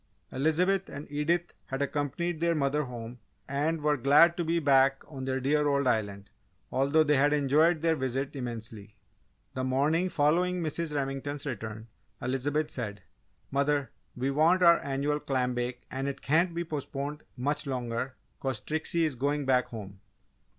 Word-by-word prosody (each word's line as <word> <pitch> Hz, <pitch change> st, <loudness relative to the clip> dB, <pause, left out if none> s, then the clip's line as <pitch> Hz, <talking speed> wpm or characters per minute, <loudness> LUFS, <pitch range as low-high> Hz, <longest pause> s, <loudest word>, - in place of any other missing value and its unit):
Elizabeth 175 Hz, +8 st, +1 dB
and 145 Hz, +1 st, -7 dB
Edith 165 Hz, +4 st, 0 dB
had 135 Hz, -, -3 dB
accompanied 150 Hz, +4 st, -2 dB
their 170 Hz, 0 st, +2 dB
mother 145 Hz, 0 st, +1 dB
home 120 Hz, -1 st, -8 dB, 0.3 s
and 150 Hz, +4 st, -1 dB
were 150 Hz, 0 st, +2 dB
glad 145 Hz, +6 st, +6 dB
to 175 Hz, -, -1 dB
be 165 Hz, +1 st, 0 dB
back 135 Hz, -3 st, +4 dB
on 135 Hz, -3 st, -7 dB
their 130 Hz, 0 st, -1 dB
dear 145 Hz, +3 st, +2 dB
old 140 Hz, -1 st, +2 dB
island, 105 Hz, -5 st, -1 dB, 0.4 s
although 140 Hz, +4 st, +3 dB
they 150 Hz, -2 st, +3 dB
had 145 Hz, +2 st, +4 dB
enjoyed 150 Hz, +3 st, +3 dB
their 165 Hz, -1 st, +3 dB
visit 130 Hz, +1 st, -2 dB
immensely. 115 Hz, -4 st, -6 dB, 0.6 s
The 130 Hz, -, -3 dB
morning 145 Hz, +8 st, +1 dB
following 175 Hz, +4 st, +2 dB
Mrs. 155 Hz, 0 st, -3 dB
Remington's 140 Hz, +1 st, -3 dB
return, 110 Hz, -4 st, -5 dB, 0.3 s
Elizabeth 145 Hz, +5 st, -1 dB
said, 105 Hz, -7 st, -5 dB, 0.5 s
"Mother, 140 Hz, 0 st, +1 dB, 0.2 s
we 130 Hz, +2 st, -1 dB
want 165 Hz, +6 st, +4 dB
our 170 Hz, -1 st, +7 dB
annual 140 Hz, +2 st, -1 dB
clam 130 Hz, -3 st, -1 dB
bake 125 Hz, 0 st, -3 dB
and 135 Hz, +1 st, -2 dB
it 140 Hz, -, -5 dB
can't 165 Hz, +4 st, +2 dB
be 170 Hz, -, -1 dB
postponed 150 Hz, -1 st, -4 dB, 0.2 s
much 145 Hz, +4 st, -1 dB
longer 125 Hz, 0 st, -3 dB, 0.2 s
'cause 135 Hz, -4 st, -2 dB
Trixie 160 Hz, +2 st, 0 dB
is 155 Hz, -, -1 dB
going 140 Hz, +3 st, -1 dB
back 125 Hz, -1 st, +3 dB
home!" 100 Hz, -4 st, -9 dB
140 Hz, 155 wpm, -29 LUFS, 130-155 Hz, 0.6 s, our